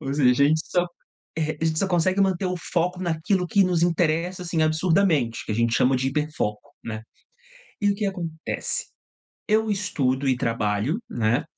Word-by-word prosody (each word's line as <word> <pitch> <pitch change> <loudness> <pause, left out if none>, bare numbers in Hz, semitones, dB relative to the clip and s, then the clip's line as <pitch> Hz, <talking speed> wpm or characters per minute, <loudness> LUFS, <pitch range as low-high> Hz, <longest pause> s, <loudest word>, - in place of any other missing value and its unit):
Ou 135 -3 -3
seja, 140 -3 +4
a - - +6
gente 155 +1 +2
só 175 -1 +1 0.5
eh, 155 0 -1
a - - 0
gente 160 -1 +1
só 195 - +1
consegue 185 +2 +2
manter 190 -1 +2
o 180 0 -1
foco 180 +1 -1
naquilo 180 +2 0
que 200 +3 +3
nos 175 -2 +1
interessa, 175 +1 +1
assim, 170 -2 -1
absurdamente, 155 - +2
que - - -2
a - - -1
gente 115 +1 +1
chama 130 +1 +3
de 130 +1 0
hiperfoco, 145 -5 -2
né. 110 -1 -5 0.8
E 205 - +3
o - - +1
que 200 0 -2
acontece? 170 -4 -3 0.6
Eu 220 0 +2
estudo 140 -9 0
e 130 - +3
trabalho, 115 - 0
né, 120 +5 +1
160 Hz, 180 wpm, -24 LUFS, 130-180 Hz, 0.8 s, a